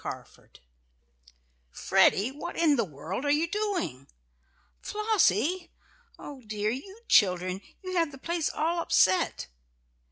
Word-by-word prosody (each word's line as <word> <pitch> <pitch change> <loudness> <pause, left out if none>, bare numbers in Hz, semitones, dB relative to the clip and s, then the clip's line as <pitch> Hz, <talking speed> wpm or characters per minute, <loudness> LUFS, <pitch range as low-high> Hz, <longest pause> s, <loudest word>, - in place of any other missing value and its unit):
CARFORD - - -10 1.1
"Freddie, 200 - +2
what 300 +5 -7
in 320 -4 +4
the 235 - +1
world 175 - -6
are 290 - -1
you 300 +3 +2
doing?" 335 - -3 0.7
"Flossie! 365 - +1 0.5
Oh 280 -3 -10
dear! 210 0 -1
You 385 - -8
children! 185 -1 +3 0.2
You 370 0 -5
have 330 -3 +1
the 270 - -11
place 335 +2 -2
all 335 +2 -1
upset!" 185 - +2
290 Hz, 120 wpm, -28 LUFS, -, 1.1 s, in